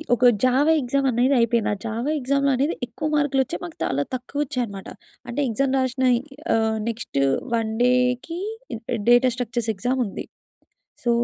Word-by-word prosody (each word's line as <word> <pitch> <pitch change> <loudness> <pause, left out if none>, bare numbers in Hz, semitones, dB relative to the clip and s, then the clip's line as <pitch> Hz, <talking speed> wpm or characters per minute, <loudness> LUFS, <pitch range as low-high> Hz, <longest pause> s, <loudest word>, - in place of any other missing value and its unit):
ఒక 250 - -4 0.2
Java 270 +5 +4
exam 270 +2 0
అనేది 250 +4 +2
అయిపోయింది. 235 -1 +2
ఆ - - -4
జావా 230 +6 -2
ఎగ్జామ్ 280 +2 +1
అనేది 280 +6 +1
ఎక్కువ 305 - -4
మార్కులు 285 -2 +2
వచ్చేయి, 180 - -6
మాకు 170 - -10
చాలా 140 +1 0
తక్కువ 255 +3 -6
వచ్చాయి 255 -3 -2
అన్నమాట. 195 -2 -9 0.4
అంటే 250 +5 -2
ఎగ్జామ్‌ 270 +4 0
రాసిన 260 0 0 0.5
ఆహ్, 220 0 +1
నెక్స్ట్ 225 - -3 0.4
వన్ 220 -1 -1
డేకి 250 +6 +1 0.3
day - - -3
day 240 - 0
data 245 +1 +6
structures 240 -2 -3
exam 250 +6 -1
ఉంది. 195 - -6 0.8
సో, 240 - +1
250 Hz, 165 wpm, -23 LUFS, 230-270 Hz, 0.8 s, data